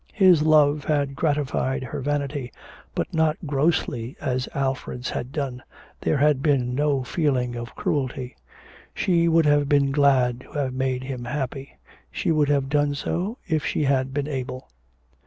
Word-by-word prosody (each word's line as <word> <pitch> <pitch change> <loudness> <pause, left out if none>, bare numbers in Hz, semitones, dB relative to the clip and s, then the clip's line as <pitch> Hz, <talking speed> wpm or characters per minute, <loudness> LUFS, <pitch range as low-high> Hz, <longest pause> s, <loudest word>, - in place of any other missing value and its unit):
His 185 -6 +6
love 150 -2 +4
had 145 -3 0
gratified 140 -3 0
her 130 - -5
vanity, 140 -2 -2 0.4
but - - -2
not 160 -1 +2
grossly 140 -4 0
as 130 -2 -2
Alfred's 130 -2 -2
had 125 - -4
done, 135 -4 -3 0.4
there - - +1
had 145 -1 +3
been 135 -5 +1
no 140 -1 +1
feeling 125 -5 0
of 120 0 -7
cruelty; 130 -3 -2 0.6
she 170 -2 +2
would 165 -1 +4
have 145 -1 +3
been 140 -1 +3
glad 135 -4 +3
to - - -16
have 140 -3 -1
made 130 -1 -1
him 130 -2 -5
happy; 135 +1 -4 0.3
she 70 - -1
would 150 -2 +2
have 140 -2 +2
done 145 0 +1
so 185 - -2
if 155 -4 0
she - - 0
had 135 -1 +1
been 145 +1 -2
able. 130 -2 -5
140 Hz, 155 wpm, -24 LUFS, 130-150 Hz, 0.6 s, His